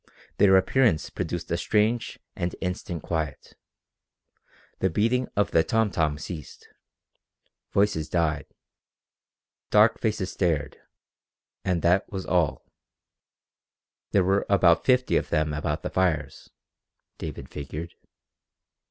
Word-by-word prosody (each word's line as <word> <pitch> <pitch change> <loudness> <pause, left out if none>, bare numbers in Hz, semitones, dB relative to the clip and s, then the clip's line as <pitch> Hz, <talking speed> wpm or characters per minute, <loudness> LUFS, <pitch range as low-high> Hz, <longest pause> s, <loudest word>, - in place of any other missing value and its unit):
Their 95 -2 +7
appearance 110 -3 +2
produced - - -4
a - - +1
strange 110 +2 0 0.2
and 85 0 -3
instant 90 -3 -4
quiet. 80 -4 -4 1.3
The 95 - +2
beating 115 +8 +1
of 100 - +1
the 80 - +4
tom 110 +1 +1
tom 75 -4 0
ceased. 75 -1 -8 1.0
Voices 100 -6 +1
died. 80 -4 0 1.2
Dark 105 +2 +5
faces 105 -4 -1
stared 80 -7 -1 0.8
and 90 -3 0
that 90 +3 +2
was 95 -2 -4
all. 85 -5 0 1.4
There 100 - +3
were 95 +2 +1
about 85 -4 +4
fifty 125 -1 +3
of - - -2
them 75 0 0
about 75 +1 -2
the - - -4
fires, 80 -7 -1 0.7
David - - -6
figured. 75 +4 -7
90 Hz, 110 wpm, -26 LUFS, 80-100 Hz, 1.4 s, Their